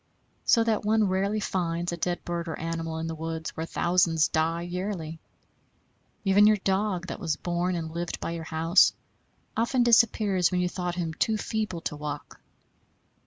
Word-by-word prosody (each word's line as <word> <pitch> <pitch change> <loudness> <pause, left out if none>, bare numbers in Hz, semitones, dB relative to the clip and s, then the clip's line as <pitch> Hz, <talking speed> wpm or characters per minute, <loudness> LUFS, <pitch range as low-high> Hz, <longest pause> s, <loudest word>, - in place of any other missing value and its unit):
So 230 - +5
that 225 -2 0
one 215 0 +3
rarely 200 +3 0
finds 175 -4 -1
a - - -2
dead 175 +1 -2
bird 170 -1 -3
or 160 - -4
animal 165 0 -3
in 160 - -3
the 165 - -3
woods 160 0 -4
where 160 +1 -5
thousands 170 -3 +2
die 165 +2 0
yearly. 175 -3 -4 1.1
Even 200 +2 +6
your 215 0 +5
dog, 190 -1 0
that - - -6
was 160 -3 -1
born 175 +1 -1
and 160 -2 -4
lived 170 +1 -3
by - - -3
your 165 -1 -5
house, 165 +3 +4 0.6
often 240 +2 +2
disappears 215 -6 +4
when 180 - +1
you 180 - +1
thought 180 -1 -3
him 170 -3 -2
too 220 +6 +1
feeble 210 -5 -3
to 150 - -4
walk. 150 -1 -7
175 Hz, 170 wpm, -27 LUFS, 165-200 Hz, 1.1 s, Even